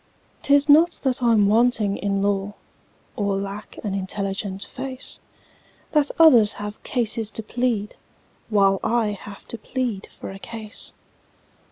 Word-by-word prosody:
"'Tis 285 0 +4
not 320 +4 +6
that 260 -2 +1
I'm 230 -4 +4
wanting 220 -2 +3
in 195 -1 -1
law, 200 0 -1 0.6
Or 200 -2 0
lack 200 +2 -6
an 205 -3 -2
intelligent 195 0 -2
face, 260 +4 -6 0.7
That 295 -2 +3
others 245 -10 +7
have 205 0 -7
cases 225 -3 0
to 225 - -6
plead, 230 -2 -1 0.5
While 195 -2 +3
I 230 -2 +1
have 205 0 -9
to 230 - -4
plead 240 -4 -3
for - - -9
a 195 - -9
case. 220 -1 -6
210 Hz, 135 wpm, -23 LUFS, 200-245 Hz, 0.7 s, others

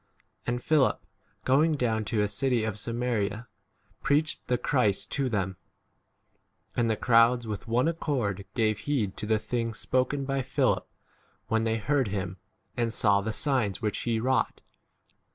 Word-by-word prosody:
And 120 0 -1
Philip, 150 -4 +2 0.4
going 150 +5 +4
down 115 -5 0
to 105 0 +1
a - - +1
city 125 +1 0
of 110 -2 -3
Samaria, 115 -1 -2 0.5
preached 150 +2 +1
8 - - -39
the 125 - +2
Christ 115 -9 +1
to 135 -3 0
them; 95 -4 -1 1.2
and 115 -1 +2
the 110 - +2
crowds 120 0 +4
with 110 +1 -5
one 120 +5 +2
accord 125 - -1
gave 110 -3 +1
heed 110 -7 -1
to 105 - -4
the 110 0 +3
things 115 0 -3
spoken 130 +2 0
by 135 0 0
Philip, 130 - +1 0.6
when 115 -1 +1
they 110 0 +1
heard 135 +2 +1
[him] 95 -2 -3 0.4
and 115 -2 0
saw 100 -3 +3
the 110 +2 -2
signs 120 -6 0
7 - - -23
which 105 - -1
he 115 -2 0
wrought. 130 +3 0
115 Hz, 160 wpm, -28 LUFS, 105-130 Hz, 1.2 s, going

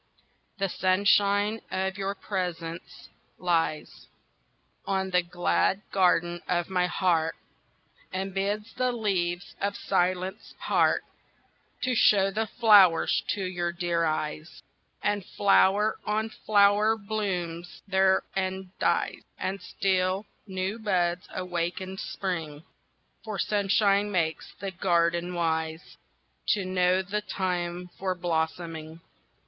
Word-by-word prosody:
THE 195 -1 0
sunshine 200 +3 +2
of 190 0 -1
your 200 0 -3
presence 175 -4 -5 0.3
lies 165 -3 -1 0.8
On 190 -1 -1
the 180 0 +4
glad 175 +3 0
garden 175 -2 +2
of 175 +1 -1
my 180 -1 +2
heart 170 -3 +1 0.8
And 190 +1 -3
bids 205 +3 -2
the 255 0 0
leaves 185 -5 -1
of 200 0 -1
silence 185 0 -1
part - - +2 0.8
To 255 0 +1
show 195 -4 +4
the 220 +3 -1
flowers 205 -8 +5
to 200 - -3
your 175 -2 -2
dear 170 -1 -1
eyes, 155 0 -3 0.4
And 205 -1 0
flower 200 +2 +3
on 215 +1 -1
flower 210 +1 +3
blooms 185 -5 -4
there 190 -1 +3
and 190 0 -3
dies - - +1 0.2
And 190 +1 -3
still 190 +1 0 0.2
new 190 +3 -3
buds 180 -4 0
awakened 180 +1 -3
spring, 165 -6 -4 0.6
For 215 -2 -5
sunshine 205 0 +2
makes 165 -4 -1
the 195 0 -4
garden 175 -1 +1
wise, 160 -1 -2 0.6
To 200 -3 -3
know 185 0 +2
the 205 +3 -2
time 180 -3 -3
for 185 -1 -1
blossoming. 165 -1 -3
185 Hz, 110 wpm, -27 LUFS, 175-200 Hz, 0.8 s, flowers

